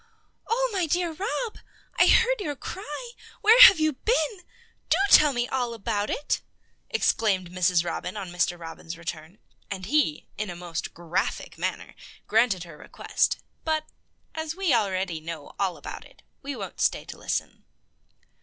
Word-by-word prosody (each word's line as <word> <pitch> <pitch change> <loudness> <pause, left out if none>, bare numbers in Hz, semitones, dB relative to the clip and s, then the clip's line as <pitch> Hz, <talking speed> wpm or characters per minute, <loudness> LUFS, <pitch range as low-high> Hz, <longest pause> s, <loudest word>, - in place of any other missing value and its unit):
"Oh, - - +1
my 365 -4 0
dear 345 +2 +1
Rob! 415 +7 -3 0.4
I - - +7
heard - - +4
your 295 -6 -3
cry. 380 - -7 0.3
Where 450 +4 +7
have 390 -8 +11
you 310 -1 +2
been? 440 - +1 0.7
Do 325 - +4
tell 300 -1 +8
me 245 -2 -1
all 245 -3 -2
about 210 -2 -2
it!" 290 - -1 0.5
exclaimed 190 -5 +1
Mrs. 180 -1 +2
Robin 180 +3 -4
on 190 -3 -6
Mr. 175 0 0
Robin's 165 0 -8
return, 170 +2 -7 0.3
and 190 -2 -5
he, 230 - +1
in 210 -2 -2
a 175 - -5
most 175 -2 -5
graphic 170 +1 -2
manner, - - -3 0.3
granted 220 -5 +2
her 165 -4 -12
request; - - -1 0.3
but, 315 -1 0 0.5
as 315 0 -4
we 375 -6 +1
already 190 -6 0
know 160 -2 -8
all 195 -3 0
about - - -8
it, - - -20 0.2
we 280 0 -5
won't - - -7
stay - - +1
to - - -10
listen. - - -3
220 Hz, 155 wpm, -26 LUFS, -, 0.7 s, have